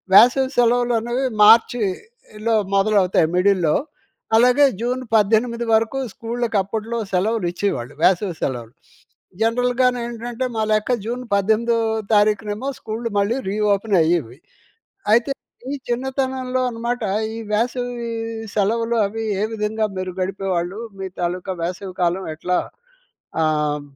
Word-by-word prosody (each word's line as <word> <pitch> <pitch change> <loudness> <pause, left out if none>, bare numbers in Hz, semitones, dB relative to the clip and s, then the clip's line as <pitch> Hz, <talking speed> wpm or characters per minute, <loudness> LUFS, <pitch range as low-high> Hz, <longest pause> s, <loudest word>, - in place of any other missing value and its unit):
వేసవి 260 +4 +6
సెలవులు 245 0 +3
అనేవి 245 +3 -1 0.2
మార్చిలో 225 - +2 0.2
మొదలవుతాయి 195 -5 +3
మిడిల్‌లో. 180 -5 +3 0.6
అలాగే 250 +4 +5 0.2
జూన్ 250 +2 -1
18 230 +3 +2
వరకు 225 +4 +1 0.2
స్కూళ్ళకి 230 -1 -2
అప్పట్లో 225 +3 -4 0.2
సెలవులు 205 +1 +1
ఇచ్చేవాళ్ళు 150 -11 -2
వేసవి 185 -1 +3
సెలవులు. 120 -3 -3 0.7
జనరల్‌గా 245 +2 +2
నెంటంటే, 235 +1 -4
మా 220 - 0
లెక్క 215 +4 +2
జూన్ 245 +2 -3
పద్దెనిమిదో 220 +4 +2 0.4
తారీఖునేమో 210 +3 +1
స్కూల్‌లు 230 +1 -4
మళ్ళీ 205 +5 +1
రీ‌ఓపెన్ 205 0 +1
అయ్యేవి. 160 -7 0 0.8
అయితే 235 +4 +4 0.4
మీ 285 - -2
చిన్నతనంలో 260 0 -1
అనమాట 235 +1 -3 0.3
ఈ - - -5
వేసవి 245 +1 -1 0.5
సెలవులు, 230 +3 +1
అవి 225 +2 -4 0.2
ఏ - - +2
విధంగా 215 0 -1
మీరు 185 -1 -3
గడిపేవాళ్ళు 190 0 -2 0.2
మీ 190 - -3
తాలూకా 180 +2 -2
వేసవి 185 +2 -4
కాలం 175 +2 0
ఎట్లా 180 +3 -1 0.8
ఆహ్, 150 -2 +1
220 Hz, 115 wpm, -21 LUFS, 190-240 Hz, 0.8 s, వేసవి